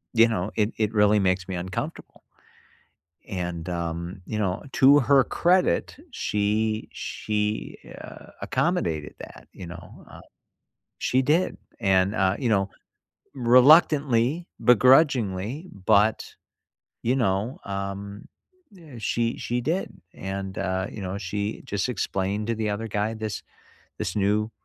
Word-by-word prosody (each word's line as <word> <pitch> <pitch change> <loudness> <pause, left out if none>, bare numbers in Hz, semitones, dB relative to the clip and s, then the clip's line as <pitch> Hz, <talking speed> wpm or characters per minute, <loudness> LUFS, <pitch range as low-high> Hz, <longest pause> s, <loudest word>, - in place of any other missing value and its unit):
you 115 0 +7
know, 105 -3 -2
"it 105 0 +1
it 110 0 0
really 105 0 +4
makes 95 -1 0
me 95 - -4
uncomfortable." 90 +1 -6 1.1
And, 90 -3 -4
um, 85 +2 -4
you 110 - -4
know, 95 -3 -1
to 140 +2 +6
her 135 +1 +4
credit, 180 +6 +1 0.2
she 110 - -1
she 105 0 -3
a - - -12
accommodated 80 -3 -1
that, - - -12
you 90 - -9
know, 85 0 -11
uh, - - -12 0.8
she 130 +1 +1
did, 160 +7 +1 0.2
and, 95 -2 +2
uh, 95 -1 +2
you 125 - -1
know, 100 -3 +1 0.6
reluctantly, 135 +2 +4 0.2
begrudgingly, 125 - +3 0.2
but, 105 +2 +3 0.7
you 125 +3 +2
know, 110 0 0
um, 100 +1 -5 0.5
eh, 160 -7 -13
she 115 +2 -1
she 120 +1 -2
did. 165 +10 -1 0.2
And, 95 0 -5
uh, 95 0 -1
you 105 - -8
know, 95 +1 -4
she 100 +2 -3
just 100 +3 -2
explained 100 -1 -2
to 115 - 0
the 110 -1 -2
other 110 +2 -3
guy, 105 +1 -1
"This 110 -2 -5 0.6
this 100 -4 -3
new 105 +2 +1
105 Hz, 130 wpm, -25 LUFS, 95-120 Hz, 1.1 s, you